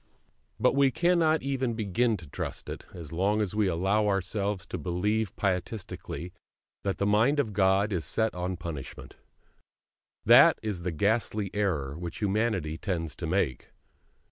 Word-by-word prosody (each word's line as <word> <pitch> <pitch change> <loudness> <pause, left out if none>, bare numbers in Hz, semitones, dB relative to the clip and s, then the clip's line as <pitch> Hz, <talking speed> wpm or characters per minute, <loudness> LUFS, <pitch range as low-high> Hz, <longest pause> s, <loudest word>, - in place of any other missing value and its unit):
But - - +3
we 140 -1 +4
cannot 165 +2 +2
even 130 -3 -1
begin 110 +2 +1
to 85 -4 -11
trust - - -6
it, - - -7
as 85 -4 -9
long 100 +5 +1
as 105 -3 -1
we 105 -2 +2
allow 95 +5 +1
ourselves 100 0 -1
to - - -5
believe 105 +4 -1
pietistically 90 -2 -3 0.5
that 100 -1 -2
the 100 - 0
Mind 110 +8 +3
of 110 -7 0
God 95 +2 +3
is 85 -3 -1
set 110 0 0
on 90 +1 -3
punishment. 80 -6 -8 1.1
That - - +8
is 105 -5 -3
the 90 0 -2
ghastly 105 +3 0
error 80 -10 -1
which 85 +1 -6
humanity 100 -7 0
tends 85 -7 -3
to 85 - -4
make. 80 -7 -1
100 Hz, 150 wpm, -28 LUFS, 90-110 Hz, 1.1 s, That